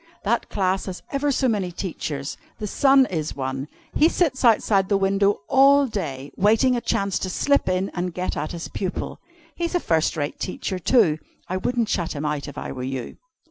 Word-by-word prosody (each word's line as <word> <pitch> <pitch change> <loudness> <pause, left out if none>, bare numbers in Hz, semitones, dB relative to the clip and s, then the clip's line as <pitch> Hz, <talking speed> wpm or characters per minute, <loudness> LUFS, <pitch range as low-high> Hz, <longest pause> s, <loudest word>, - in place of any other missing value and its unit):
That 235 +3 0
class 190 -1 0
has 185 -1 -6
ever 285 +1 +1
so 265 0 +1
many 200 -6 0
teachers. 155 -6 -4 0.2
The 215 - -4
Sun 270 +5 +5
is 155 -4 -2
one. 135 +1 -3 0.3
He 315 - +5
sits 290 -9 0
outside 210 -4 +4
the 200 - +3
window 195 +1 +2
all 275 +1 +6
day 145 - -4
waiting 225 +6 +3
a 240 - -1
chance 200 -3 0
to 185 - -3
slip 280 +5 +2
in 185 +1 0
and 180 0 -2
get 180 +2 -3
at 155 - -3
his 170 -1 -5
pupil. 190 -2 -4 0.4
He's 340 +1 -2
a - - +3
first 165 - +1
rate 145 -1 -3
teacher, 185 0 -3
too. 180 -5 +3 0.3
I 185 - -2
wouldn't 235 +4 0
shut 175 -5 -1
him 150 0 -4
out, 150 -1 -2
if 145 0 -9
I - - -5
were 130 - -6
you. 130 -1 -5
190 Hz, 195 wpm, -23 LUFS, 160-240 Hz, 0.4 s, all